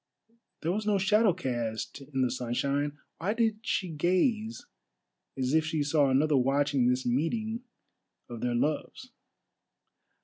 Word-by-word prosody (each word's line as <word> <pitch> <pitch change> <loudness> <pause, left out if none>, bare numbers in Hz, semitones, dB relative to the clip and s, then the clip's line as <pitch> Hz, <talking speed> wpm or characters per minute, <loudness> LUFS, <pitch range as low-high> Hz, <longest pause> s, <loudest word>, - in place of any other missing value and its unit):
There 165 - +1
was 210 +3 -2
no 205 -1 +3
shadow 210 +2 +4
cast 120 -8 -3
in 135 -1 -2
the 125 - +1
sunshine; 140 +4 -1 0.2
why 200 +6 -1
did 225 -2 +1
she 195 -4 -1
gaze 185 - 0 0.7
as 130 +1 0
if 160 0 +4
she 155 -1 -1
saw 145 -1 +3
another 145 +2 +3
watching 135 0 +2
this 125 +1 +1
meeting 215 - -1 0.7
of 120 -2 -8
their 120 -1 0
loves? 155 - -2
150 Hz, 135 wpm, -29 LUFS, 130-195 Hz, 0.7 s, shadow